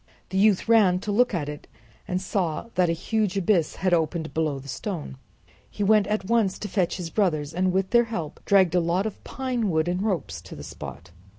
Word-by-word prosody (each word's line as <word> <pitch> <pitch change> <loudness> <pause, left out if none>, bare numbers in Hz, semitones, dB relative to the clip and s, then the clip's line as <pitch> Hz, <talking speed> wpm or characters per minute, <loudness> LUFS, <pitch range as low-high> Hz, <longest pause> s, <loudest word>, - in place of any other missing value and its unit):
The 190 - -2
youth 205 -1 +3
ran 210 -6 +5
to 210 - -3
look 245 +5 +3
at 165 -7 -2
it 150 0 -7 0.4
and 180 - -1
saw 185 +1 -2
that 180 -1 +2
a - - +3
huge 200 +3 -1
abyss 180 -4 +2
had 185 -2 0
opened 160 -1 0
below 155 -3 0
the 135 +1 -10
stone. 145 +3 -5 0.5
He 205 - -3
went 210 -1 +4
at 210 -2 -1
once 220 -3 +2
to 210 - -5
fetch 185 -3 0
his 170 -3 -5
brothers, 155 -8 0
and 185 +2 +1
with 190 +1 0
their 235 0 +5
help 170 -10 -5
dragged 190 -4 +4
a 180 - +4
lot 175 +4 0
of 220 - -5
pine 250 -5 -2
wood 160 -1 +1
and 180 +1 -1
ropes 170 - -2
to 85 - -11
the - - -9
spot. - - -9
185 Hz, 215 wpm, -25 LUFS, 165-210 Hz, 0.5 s, ran